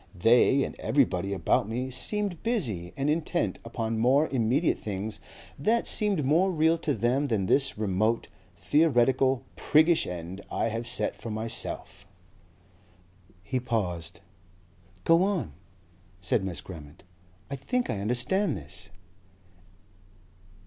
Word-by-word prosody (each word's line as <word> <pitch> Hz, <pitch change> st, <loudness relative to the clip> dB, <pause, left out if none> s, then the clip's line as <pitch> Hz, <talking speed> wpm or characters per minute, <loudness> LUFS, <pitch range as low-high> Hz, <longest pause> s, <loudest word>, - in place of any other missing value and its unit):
They, 120 Hz, +8 st, +4 dB
and -, -, -4 dB
everybody 110 Hz, -6 st, +1 dB
about 100 Hz, +1 st, +1 dB
me, 125 Hz, +3 st, -3 dB
seemed 200 Hz, +6 st, -2 dB
busy 120 Hz, -, -1 dB
and 140 Hz, +1 st, -1 dB
intent 165 Hz, +3 st, -1 dB
upon 115 Hz, -1 st, -3 dB
more 135 Hz, +6 st, +4 dB
immediate 130 Hz, +5 st, +1 dB
things, 105 Hz, +1 st, -4 dB, 0.4 s
that 225 Hz, +11 st, +1 dB
seemed 205 Hz, -, +3 dB
more 165 Hz, +8 st, +3 dB
real 160 Hz, 0 st, +2 dB
to 150 Hz, -3 st, -1 dB
them 125 Hz, +6 st, +1 dB
than 110 Hz, -7 st, 0 dB
this 135 Hz, +6 st, +2 dB
remote, 110 Hz, +2 st, 0 dB, 0.3 s
theoretical, 135 Hz, -3 st, +2 dB
PRIGGISH 160 Hz, +2 st, +3 dB
end 90 Hz, +2 st, -6 dB
I -, -, 0 dB
have 115 Hz, +2 st, -4 dB
set -, -, 0 dB
for 115 Hz, -, -8 dB
myself...." 110 Hz, -4 st, -5 dB, 1.4 s
He 130 Hz, +7 st, -2 dB
paused. 90 Hz, -8 st, -3 dB, 0.8 s
"Go 165 Hz, +1 st, +5 dB
on," 190 Hz, -, -1 dB, 0.7 s
said 95 Hz, +2 st, 0 dB
Miss 95 Hz, -3 st, -4 dB
Grammont. 75 Hz, -5 st, -11 dB, 0.5 s
"I -, -, -1 dB
think 240 Hz, -, -2 dB
I 100 Hz, -, -3 dB
understand 125 Hz, -, 0 dB
this." 95 Hz, +2 st, -11 dB
120 Hz, 120 wpm, -27 LUFS, 100-155 Hz, 1.4 s, Go